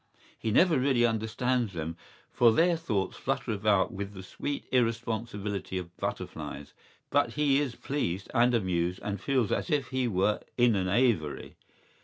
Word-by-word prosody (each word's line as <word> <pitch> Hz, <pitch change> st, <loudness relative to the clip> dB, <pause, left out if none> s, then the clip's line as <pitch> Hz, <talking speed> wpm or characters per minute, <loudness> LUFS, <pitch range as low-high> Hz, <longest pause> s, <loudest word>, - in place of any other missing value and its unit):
¬Ý -, -, -29 dB
He -, -, +2 dB
never 160 Hz, -, +4 dB
really 130 Hz, -2 st, +3 dB
understands 115 Hz, 0 st, 0 dB
them, 80 Hz, 0 st, -4 dB, 0.4 s
for 120 Hz, -2 st, +5 dB
their 170 Hz, +8 st, +3 dB
thoughts 110 Hz, -, -2 dB
flutter -, -, -2 dB
about 105 Hz, 0 st, +2 dB
with 100 Hz, +1 st, -5 dB
the 95 Hz, -, -8 dB
sweet 145 Hz, +9 st, -4 dB
irresponsibility 115 Hz, -5 st, -1 dB
of 90 Hz, -1 st, -7 dB
butterflies; 70 Hz, 0 st, -5 dB, 0.4 s
but 145 Hz, +1 st, +2 dB
he 145 Hz, -2 st, +3 dB
is 135 Hz, -5 st, -2 dB
pleased 100 Hz, -10 st, -3 dB
and 120 Hz, 0 st, +4 dB
amused 90 Hz, -4 st, 0 dB
and 100 Hz, -2 st, -3 dB
feels 130 Hz, -7 st, +1 dB
as -, -, -1 dB
if 150 Hz, -4 st, 0 dB
he 130 Hz, -2 st, 0 dB
were 105 Hz, 0 st, +1 dB, 0.2 s
in 120 Hz, -2 st, +5 dB
an 95 Hz, -1 st, 0 dB
aviary. 100 Hz, -, +1 dB
115 Hz, 160 wpm, -29 LUFS, 95-130 Hz, 0.4 s, for